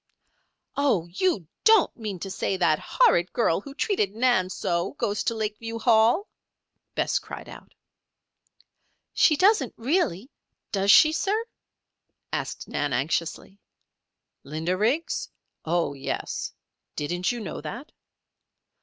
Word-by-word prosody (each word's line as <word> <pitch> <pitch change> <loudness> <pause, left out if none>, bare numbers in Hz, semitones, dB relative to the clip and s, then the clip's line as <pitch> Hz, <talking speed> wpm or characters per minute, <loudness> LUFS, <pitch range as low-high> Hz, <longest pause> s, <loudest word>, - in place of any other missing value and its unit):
"Oh! 265 - +2
you 195 - 0 0.2
don't 440 -4 +5
mean 210 -5 -5
to 195 - -5
say 190 - -1
that 155 -4 +3
that - - -13
horrid 175 +1 +3
girl 195 -7 +2
who 275 +5 -11
treated 215 - 0
Nan 225 -6 +2
so, 170 -1 -2
goes 205 0 -2
to 230 - 0
Lakeview 220 +1 -4
Hall?" 230 - +3 0.7
Bess - - +1
cried - - -9
out. - - -13 1.4
"She 305 - +5
doesn't, 370 - +3
really, 255 - 0 0.4
does 195 0 0
she, 310 +9 +8
sir?" 415 +7 0 0.9
asked - - -4
Nan, 145 -2 -2
anxiously. 165 +8 -2 0.8
"Linda 160 +5 -2
Riggs? 245 - 0 0.4
Oh, 165 -3 0
yes. 140 -1 -4 0.4
Didn't 175 +6 -1
you 240 - -4
know 210 - -6
that?" 240 - -7
210 Hz, 120 wpm, -26 LUFS, 175-275 Hz, 1.4 s, she